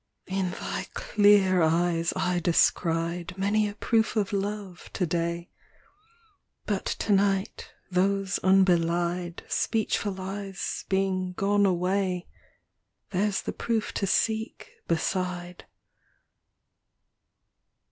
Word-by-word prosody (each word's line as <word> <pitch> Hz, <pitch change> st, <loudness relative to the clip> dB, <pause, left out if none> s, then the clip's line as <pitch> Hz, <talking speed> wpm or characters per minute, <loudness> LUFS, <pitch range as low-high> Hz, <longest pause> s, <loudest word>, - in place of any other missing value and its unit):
IX. 190 Hz, -, -5 dB
In 190 Hz, -2 st, 0 dB
thy -, -, -4 dB
clear 205 Hz, -3 st, +4 dB
eyes 165 Hz, +1 st, +2 dB
I 180 Hz, -1 st, 0 dB
descried 170 Hz, +1 st, +1 dB
Many 205 Hz, +2 st, +1 dB
a 205 Hz, -, -9 dB
proof 225 Hz, +1 st, +1 dB
of 210 Hz, -1 st, 0 dB
love, 200 Hz, -2 st, -4 dB
to 180 Hz, -, 0 dB
day; 170 Hz, +1 st, -2 dB, 1.1 s
But 200 Hz, -2 st, -2 dB
to 210 Hz, -, 0 dB
night, 195 Hz, 0 st, 0 dB, 0.2 s
those 195 Hz, +1 st, +1 dB
unbelied 175 Hz, -2 st, +2 dB
Speechful 205 Hz, -3 st, -1 dB
eyes 195 Hz, +1 st, -5 dB
being 190 Hz, -1 st, 0 dB
gone 200 Hz, +2 st, +2 dB
away, 185 Hz, 0 st, 0 dB, 0.9 s
There's 200 Hz, +1 st, 0 dB
the -, -, -4 dB
proof 225 Hz, -2 st, -2 dB
to 195 Hz, -, -1 dB
seek, 220 Hz, +3 st, -1 dB, 0.2 s
beside. 180 Hz, +1 st, -2 dB
190 Hz, 100 wpm, -27 LUFS, 175-200 Hz, 1.1 s, clear